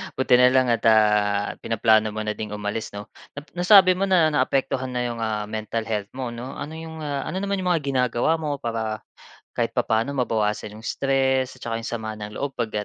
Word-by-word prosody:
buti 125 -1 +4
na 125 - +7
lang 130 -1 +3
at, 115 - +2
ah, 105 -2 +3
pinaplano 110 -1 +2
mo 110 - -2
na 105 - -1
ding 105 -1 -5
umalis 105 +1 -4
'no. 100 0 -8 0.2
Nap 145 +2 -10
nasabi 185 0 +7
mo 190 +2 0
na 170 -5 +4
naapektuhan 135 -2 0
na 125 -1 -2
'yong, 120 -1 -3
ah, 110 -2 -1
mental 110 +1 -3
health 105 -2 -3
mo 130 -2 -4
'no, 120 +3 -7
ano 160 +2 -7
'yong, 160 -1 -8
ah, 145 -2 -3
ano 190 +1 -3
naman 200 -1 -1
'yong 185 - -3
mga 160 - -2
ginagawa 130 +3 +1
mo 150 -2 -2
para 115 -4 -4 0.5
kahit - - -2
papaano 115 +6 0
mabawasan 110 -4 -1
'yong 110 - -10
stress 130 -1 0
at - - -28
saka 115 - -2
'yong 115 0 -4
sama 110 -2 -4
ng 105 0 -8
loob 140 -1 -3
'pag, 115 -3 -2
120 Hz, 210 wpm, -23 LUFS, 110-140 Hz, 0.5 s, na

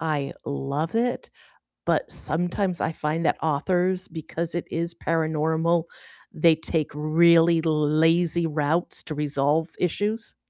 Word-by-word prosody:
I 150 -3 -2
love 140 +4 -3
it, 245 +2 -1 0.6
but - - 0
sometimes 175 +2 -1
I 160 - 0
find 155 +2 -2
that - - +2
authors 180 +4 0
because 165 +1 -5
it 175 - -2
is 170 +1 -2
paranormal, 160 +1 0 0.5
they 160 0 +4
take 160 -1 -2
really 165 +2 +4
lazy 160 +2 +2
routes 155 +3 -1
to 155 - -6
resolve 150 +2 0
issues. 210 +6 -2
165 Hz, 120 wpm, -25 LUFS, 155-170 Hz, 0.6 s, they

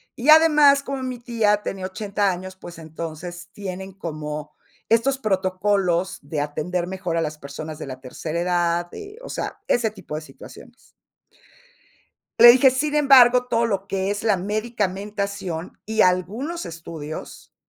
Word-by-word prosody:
Y 255 +5 -2
además, 300 -3 +7
como 275 -1 -4
mi 255 -1 -4
tía 225 -4 +1
tenía 190 -1 -4
80 200 0 -1
años, 185 +1 -7
pues, 175 -2 -11
entonces, 170 +2 -7
tienen 190 -1 -7
como 150 -4 -6 0.3
estos 260 +4 +2
protocolos, 190 -3 0
de 145 +1 -3
atender 170 +4 -2
mejor 185 -3 -3
a 165 - +1
las 155 -1 -3
personas 150 +2 -8
de - - -5
la 130 -1 -7
tercera 155 +5 -5
edad, 175 -1 0
eh, 415 +1 -9
o - - -8
sea, - - -5
ese 230 -3 +1
tipo 190 -7 -8
de 155 - -4
situaciones. 155 - -14 1.5
Le 240 - +11
dije: 260 +2 +6
"Sin 290 +4 -1
embargo, 250 -3 +6
todo 235 -1 +1
lo 195 -3 -2
que 195 0 -1
es 205 +2 -3
la 210 -3 +3
medicamentación 200 -3 -3
y 220 0 0
algunos 220 - 0
estudios, 160 -2 -8
190 Hz, 150 wpm, -23 LUFS, 170-230 Hz, 1.5 s, Le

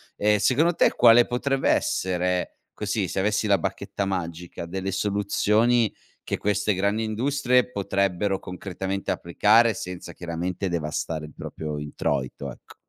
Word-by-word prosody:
ehm, 105 0 +3
secondo 155 - +3
te - - +3
quale 120 0 +7
potrebbe 135 +2 0
essere, 90 0 0
così, 105 -2 -2
se - - -2
avessi 105 +2 +1
la 100 -1 +4
bacchetta 100 +3 -3
magica, 85 -2 -4
delle 95 +2 -4
soluzioni 105 +3 +2 0.3
che - - -2
queste 105 +1 +1
grandi 100 +4 0
industrie 125 +2 +1
potrebbero 100 -1 0
concretamente 95 +1 -4
applicare 110 +6 +3
senza 90 -2 -7
chiaramente 90 +2 -3
devastare 80 -1 -3
il 75 - -13
proprio 75 -1 -6
introito, 70 -2 -3
ecco. - - -15
100 Hz, 130 wpm, -25 LUFS, 90-110 Hz, 0.3 s, quale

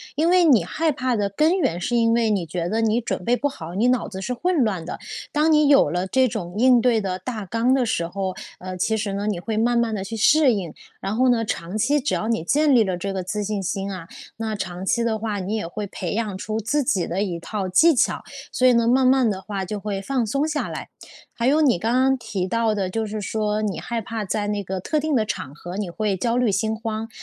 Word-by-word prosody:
因 315 +4 +2
为 360 -1 +5
你 250 - +5
害 310 - 0
怕 255 -3 -1
的 205 -2 0
根 310 - +2
源， 220 - 0
是 240 +7 -1
因 230 -1 +3
为 230 -1 +2
你 195 -5 0
觉 170 +1 -3
得 225 +2 0
你 225 +1 +2
准 185 - -3
备 240 - +3
不 285 - 0
好， 170 - -8
你 225 +5 +2
脑 250 -2 +1
子 190 - -7
是 250 +6 -2
混 335 +2 +1
乱 190 -7 -1
的， - - -6 0.3
当 305 +2 +2
你 300 -1 +5
有 280 - +5
了 180 +4 -1
这 260 +6 +3
种 195 -6 -5
应 250 +1 +5
对 235 -3 +3
的 185 -1 -3
大 215 +1 -5
纲 230 +6 +1
的 265 -2 +2
时 170 -7 -1
候， 190 +1 -3 0.3
呃， 185 0 -6
其 220 +5 +1
实 205 -2 -2
呢， 200 +1 -2
你 205 -5 -1
会 215 +4 -3
慢 235 +2 +2
慢 235 -1 +1
地 195 - -3
去 210 +4 -6
适 280 +4 +5
应。 185 -7 -4 0.3
然 195 +3 -2
后 255 +2 +3
呢， 230 -2 +2
长 190 -3 -4
期 280 +7 +2
只 290 - -1
要 215 - -2
你 225 -8 0
建 295 - +3
立 235 -3 +6
了 185 -3 -2
这 195 +2 -3
个 190 -1 -3
自 210 +3 -3
信 205 -1 -2
心 195 +2 -3
啊， 180 -3 -7 0.3
那 220 -1 -3
长 185 -2 -5
期 235 +4 +1
的 225 -2 0
话 210 -2 -2
你 195 +3 -3
也 210 -6 -3
会 205 +4 -5
培 185 -2 -4
养 210 -3 -2
出 215 +3 -3
自 290 +7 0
己 190 -8 +1
的 185 +3 -2
一 180 -5 -2
套 195 +2 -4
技 320 - +5
巧。 - - +1 0.3
所 255 - +3
以 250 - +6
呢， 235 -1 +3
慢 260 +2 +4
慢 255 -3 +4
的 190 -2 -3
话 195 -1 -4
就 205 +2 -4
会 200 -1 -3
放 255 +3 -1
松 275 +8 0
下 300 -1 -2
来。 - - -6 0.5
还 235 +1 0
有 300 +3 +4
你 265 -11 +4
刚 225 +4 0
刚 265 +1 +3
提 215 -6 -3
到 230 +2 +1
的， 195 -3 -1
就 225 +4 -2
是 215 +1 -4
说 210 +1 -1
你 205 -3 -2
害 235 -1 -3
怕 225 0 -4
在 205 +1 -2
那 205 -1 -2
个 190 0 -4
特 305 - -1
定 305 0 0
的 220 -3 +2
场 140 -9 -5
合， 175 +4 -8
你 205 -3 -3
会 205 +2 -1
焦 230 +5 0
虑 250 -4 +2
心 220 +3 0
慌， 225 0 -4
220 Hz, 280 characters per minute, -23 LUFS, 195-245 Hz, 0.5 s, 立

